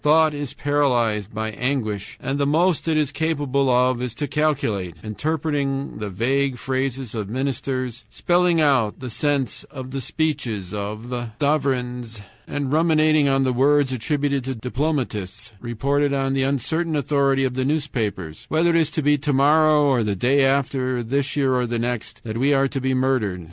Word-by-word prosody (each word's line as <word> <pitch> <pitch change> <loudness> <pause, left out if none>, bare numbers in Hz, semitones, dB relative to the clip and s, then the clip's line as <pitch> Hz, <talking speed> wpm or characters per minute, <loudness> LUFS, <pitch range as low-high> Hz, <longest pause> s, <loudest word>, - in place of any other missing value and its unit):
Thought 155 +1 +4
is 145 -3 -5
paralyzed 120 -8 +1
by 110 0 -3
anguish, 110 -5 -3
and 135 +1 -3
the 140 - +2
most 165 +3 +2
it 160 -1 +2
is 150 -3 +1
capable 145 -4 0
of 125 0 +2
is 125 -2 -3
to 145 - -2
calculate 125 - -1
interpreting 140 +4 -2
the 105 -1 -4
vague 130 +7 0
phrases 130 -1 -2
of 105 -4 -4
ministers, 130 -1 -3
spelling 175 +2 +2
out 135 -8 +2
the 130 -2 -6
sense 140 -2 -1
of 130 -3 -9
the 135 0 -3
speeches 125 - -2
of 110 +4 -4
sovereigns, 125 -6 -1 0.3
and 145 -1 -3
ruminating 155 -2 +3
on 135 0 +2
the 130 -1 +1
words 140 +2 +3
attributed 140 +2 -1
to 130 0 -3
diplomatists 120 - -3
reported 140 +5 0
on 135 -1 0
the 135 - +1
uncertain 155 +5 0
authority 140 -1 +2
of 130 - -1
the 130 +1 -1
newspapers 115 - -2
whether 165 +2 +3
it - - +1
is 160 -2 +3
to 155 -1 -2
be 145 +1 +4
to 145 +2 -1
morrow 150 +2 +4
or 135 -4 +3
the 105 -2 -1
day 135 +7 +3
after, 130 -2 +1
this 135 +4 -1
year 135 -3 +2
or 125 -1 +1
the 120 0 -2
next, 120 -1 -4
that 110 0 -4
we 140 +2 +3
are 135 0 +3
to 135 0 -4
be 130 0 0
murdered. 130 -8 0
135 Hz, 175 wpm, -22 LUFS, 120-145 Hz, 0.3 s, Thought